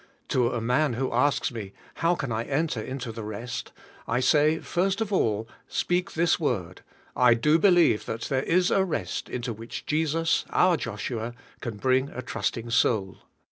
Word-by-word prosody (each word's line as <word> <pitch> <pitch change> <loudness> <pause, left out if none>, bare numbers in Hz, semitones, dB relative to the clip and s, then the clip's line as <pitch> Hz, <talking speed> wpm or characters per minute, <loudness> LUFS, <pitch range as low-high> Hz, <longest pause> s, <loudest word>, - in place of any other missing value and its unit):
To 125 -2 +2
a 120 - -1
man 125 +5 +1
who 130 +3 -2
asks 140 +3 +2
me, 105 -5 -7 0.2
"How 170 +1 +2
can 140 -7 -4
I 115 +1 -1
enter 145 -4 -1
into 130 0 -5
the 110 0 -7
rest?"' 110 +4 -5 0.4
I 115 +2 +1
say, 150 +4 +4
first 190 +4 -1
of 215 -2 -2
all, 110 - +1 0.2
speak 180 0 -1
this 170 +1 +2
word, 95 - -2 0.3
"I 120 -1 +5
do 150 +7 +3
believe 175 - +4
that 115 - -4
there 130 +1 0
is 180 +5 +2
a 195 - +4
rest 185 - -3
into 120 -1 -3
which 115 +2 -8
Jesus, 160 +1 +1
our 180 -1 +4
Joshua, 115 -1 -4 0.2
can 115 -5 -5
bring 130 +4 +2
a 125 - -7
trusting 115 0 -3
soul." 105 -4 +1
125 Hz, 170 wpm, -26 LUFS, 115-160 Hz, 0.4 s, I